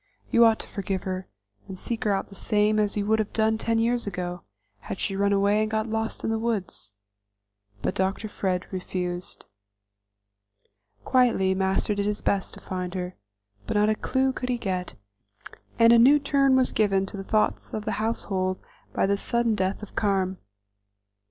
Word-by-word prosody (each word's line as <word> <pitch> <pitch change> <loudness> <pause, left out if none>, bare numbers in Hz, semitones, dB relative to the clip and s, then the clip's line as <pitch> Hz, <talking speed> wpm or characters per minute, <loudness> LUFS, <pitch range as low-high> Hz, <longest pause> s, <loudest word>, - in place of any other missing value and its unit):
You 235 0 +6
ought 225 -1 +5
to - - -9
forgive 195 -2 -3
her, 185 0 -4 0.4
and 190 - -7
seek 230 +4 -4
her 210 - +3
out 195 - -1
the 195 - -13
same 210 +1 +2
as 210 0 0
you 200 - 0
would 220 +1 +2
have 215 - -2
done 220 0 +2
ten 230 0 0
years 235 0 +1
ago, 180 -2 -4 0.4
had 190 - -7
she 195 - -1
run 200 +1 +2
away 200 +1 +3
and 215 - 0
got 220 0 0
lost 220 0 -2
in - - 0
the 225 - 0
woods." 200 - -3 0.9
But - - 0
Dr. 190 +3 -1
Fred 185 -3 -2
refused. 180 -1 -4 1.6
Quietly 240 -7 +3
Master 190 +2 +1
did 205 0 -1
his 210 0 -1
best 195 -2 0
to - - -11
find 180 -1 -5
her, 180 0 -4 0.5
but - - 0
not 210 +1 +4
a 215 - +2
clew 265 +3 0
could 250 0 -4
he 245 - +1
get, 185 -5 -3 0.8
and 230 0 +7
a 235 - +7
new 270 +5 +7
turn 275 -2 +3
was 260 -1 +3
given 195 -3 +2
to 195 - -8
the 195 - -5
thoughts 215 +2 0
of 215 -1 -4
the - - -1
household 190 -4 -1 0.4
by - - +2
the 200 +1 +1
sudden 235 0 +1
death 195 0 -1
of 210 - -10
Carm. 190 -3 0
205 Hz, 185 wpm, -26 LUFS, 190-225 Hz, 1.6 s, and